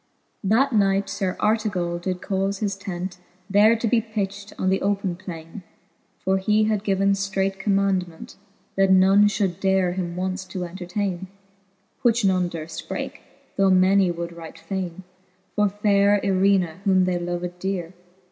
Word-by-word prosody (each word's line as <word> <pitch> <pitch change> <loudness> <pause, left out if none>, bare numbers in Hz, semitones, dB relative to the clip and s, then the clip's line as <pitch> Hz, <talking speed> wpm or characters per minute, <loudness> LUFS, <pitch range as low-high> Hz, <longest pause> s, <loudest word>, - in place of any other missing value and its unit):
X. - - -44
That 245 +7 +3
knight 195 -2 +2
Sir 185 -2 -2
Artegall 200 -6 0
did 180 0 -3
caufe 195 0 -1
his 205 -3 -1
tent 185 -2 -6 0.3
There 210 +3 +5
to 230 +1 -1
be 230 +1 +3
pitched 205 -2 -4
on 185 - +1
the 190 - +1
open 195 -2 0
plainc; 170 -1 -9 0.6
For 190 0 0
he 210 +3 +2
had 215 -2 0
given 195 -1 +2
ftreight 195 0 -1
commaundment. 195 -4 -1 0.4
That 195 0 +3
none 190 +2 +6
fhould 195 -4 -1
dare 190 -2 +2
him 175 -2 -4
once 185 +1 -2
to 185 -1 -5
entertaine: 185 +1 -4 0.7
Which 235 -2 +3
none 185 -2 +2
durft 165 -1 -7
breake, - - -5 0.4
though 195 -1 +4
many 190 0 +4
would 170 0 -4
right 165 -1 -10
faine 190 -2 -5 0.5
For 210 -1 +3
fay 205 0 +2
re 205 0 +4
Irena^ 190 -3 +2
whom 190 -2 +3
they 180 -1 0
loved 175 0 -4
deare. 185 -2 -3
190 Hz, 155 wpm, -23 LUFS, 180-200 Hz, 0.7 s, none